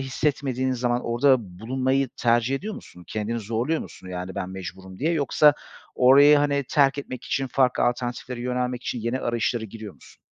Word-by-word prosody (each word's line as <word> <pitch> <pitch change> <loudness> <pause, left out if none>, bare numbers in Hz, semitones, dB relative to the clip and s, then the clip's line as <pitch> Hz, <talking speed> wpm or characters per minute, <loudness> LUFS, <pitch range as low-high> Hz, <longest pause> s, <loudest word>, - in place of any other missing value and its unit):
hissetmediğin 130 -1 -1
zaman 120 0 -1
orada 130 +3 +4 0.2
bulunmayı 130 +3 0
tercih 120 +2 +2
ediyor 205 +9 -4
musun? 90 - -13
Kendini 110 +2 -3
zorluyor 115 +9 -1
musun, 95 - -10
yani 90 +1 -5
"Ben 95 -2 -4
mecburum." 95 0 -8
diye 165 +4 +1
yoksa 150 -1 +4 0.4
orayı, 140 +4 +7
hani, 145 -1 +1
terk 140 -1 +3
etmek 130 -2 -6
için, 135 -1 -1
farklı 130 -1 +1
alternatiflere 120 0 -2
yönelmek 125 0 -2
için 120 - -3
yeni 115 +4 -2
arayışlara 120 0 -1
giriyor 110 -1 -9
musun? - - -19
125 Hz, 160 wpm, -24 LUFS, 115-135 Hz, 0.4 s, orayı